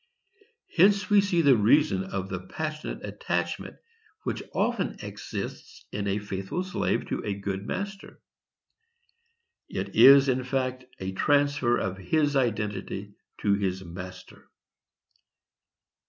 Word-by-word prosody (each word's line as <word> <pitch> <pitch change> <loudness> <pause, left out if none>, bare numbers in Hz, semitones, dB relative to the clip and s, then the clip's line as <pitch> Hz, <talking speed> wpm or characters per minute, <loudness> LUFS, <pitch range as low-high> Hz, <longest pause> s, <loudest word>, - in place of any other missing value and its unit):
Hence 195 +2 +4
we 205 -1 +7
see 190 -4 +2
the 140 -3 +7
reason 110 -2 +3
of 95 0 -4
the 90 -1 -4
passionate 155 - -5
attachment - - -3 0.5
which - - -2
often 235 -7 0
exists 100 0 -7
in 100 0 -3
a 100 +1 +1
faithful 100 - -3
slave 185 -1 -1
to - - -2
a 100 - -2
good 100 0 -4
master. 200 0 -5 1.5
It - - -4
is, 140 0 +9
in 130 -1 +1
fact, 130 0 -2
a 95 0 -3
transfer 140 +1 +2
of 95 0 -3
his 145 - +1
identity 105 -4 -1 0.3
to 100 - +3
his 95 -2 -1
master. 90 +1 -10
120 Hz, 120 wpm, -27 LUFS, 95-150 Hz, 1.5 s, is